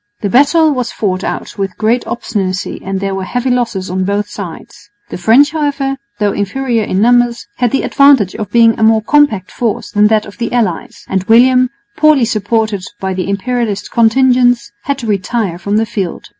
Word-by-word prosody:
The 200 - -2
battle 305 +4 +4
was 250 -4 -2
fought 190 -3 -2
out - - -5
with 195 -1 -3
great 230 +3 0
obstinacy 195 -6 -3
and 195 0 -3
there 195 0 -3
were 190 0 -3
heavy 245 +6 -2
losses 230 -6 -1
on 185 +1 -2
both 200 +2 -1
sides. 195 +3 -10 0.2
The - - -6
French, 240 +11 +4
however, 285 -3 -1 0.2
though 205 -2 +1
inferior 230 +4 -1
in 190 -1 -1
numbers 240 0 +2
had 245 -1 +1
the 270 - -1
advantage 275 -9 +4
in - - -4
being 230 +2 +3
a - - +1
more 220 0 +3
compact 255 -9 +2
force 230 -4 -3
than 210 0 +3
that 215 0 +1
of 205 - -13
the 235 - -2
allies; 215 -9 -2
and 190 -1 -1
William, 250 +3 +4 0.3
poorly 305 -5 +4
supported 215 -2 -1 0.2
by 190 0 -3
the 185 +1 -3
Imperialist 210 0 -2
contingents, 245 0 +2
had 280 -1 -1
to 255 - -7
retire 200 -2 -2
from 205 +3 -1
the 225 - +1
field. 195 -5 -5
225 Hz, 185 wpm, -14 LUFS, 200-245 Hz, 0.3 s, battle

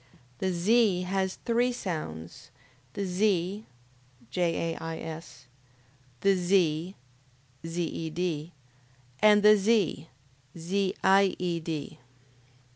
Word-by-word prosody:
The 190 - 0
Z 195 +1 +3
has 190 0 -1
three 240 +1 +2
sounds: 155 - -6 0.4
the 200 - -3
Z, 190 +1 0 0.6
(JAIS,) 165 -3 -3 0.8
the 195 0 +4
Z, 175 -1 +1 0.7
(ZED,) 165 -1 -3 0.7
and 210 -1 +6
the 210 0 +8
Z, 200 -7 +1 0.5
(ZIED). 180 -3 0
180 Hz, 70 wpm, -28 LUFS, 165-200 Hz, 0.8 s, the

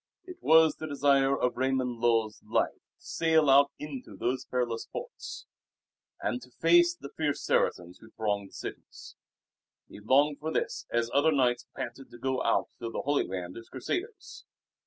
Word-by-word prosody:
It 360 -1 -11
was 160 0 +5
the 155 - -5
desire 140 -1 +3
of 125 - +1
Raymund 130 -2 -1
Lull's 115 -3 +1
life - - +1
to - - -30
sail 160 -3 +3
out 140 +1 +6
into 135 -9 -8
those 130 +4 -1
perilous 120 -3 -2
ports - - -8 0.7
and 125 - -2
to 125 - -14
face 175 +5 +4
the 140 -5 -10
fierce 150 -2 -1
Saracens 90 +1 0
who 110 - -15
thronged 100 -3 -2
the - - -24
cities. - - -9 0.7
He - - -12
longed 140 +7 +3
for 160 +1 -3
this 125 -5 -2
as 120 0 0
other 145 +3 +4
knights 125 -4 +1
panted 125 +3 -6
to - - -12
go 130 +1 -1
out 115 - +1
to 115 - -4
the - - -4
Holy 145 0 +1
Land 90 -1 -5
as 115 - -11
Crusaders. 365 - -5
130 Hz, 170 wpm, -29 LUFS, 115-150 Hz, 0.7 s, out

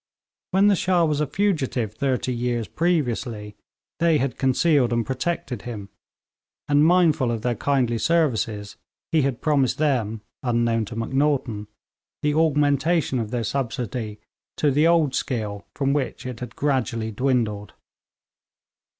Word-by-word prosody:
When 190 +2 +3
the 205 -1 +5
Shah 180 -2 +2
was 150 -1 0
a 150 - 0
fugitive 135 - 0
thirty 130 +1 -1
years 120 -1 -1
previously, 120 -10 -1 0.4
they 165 -2 +4
had 135 -3 -1
concealed 135 -1 +3
and 115 -1 +1
protected 135 -3 -3
him; 105 -5 -7 0.8
and 145 0 +4
mindful 160 -6 +4
of 115 -2 -2
their 125 - +1
kindly 125 -3 0
services, 115 -10 0 0.3
he 160 - +3
had 135 -3 -1
promised 145 -5 +2
them, 120 -8 0 0.2
unknown 115 -2 +1
to 110 - -8
Macnaghten, 130 -3 0 0.6
the 150 0 +2
augmentation 150 -1 +2
of 110 -2 -3
their 120 0 -2
subsidy 120 -3 -3 0.4
to 150 - +2
the 150 +4 +3
old 165 -5 +3
scale 105 -7 -3
from 140 -1 +1
which 140 -3 -2
it 125 -2 -5
had 125 -1 -7
gradually 115 -6 -1
dwindled. 110 -4 -1
130 Hz, 135 wpm, -23 LUFS, 115-150 Hz, 0.8 s, the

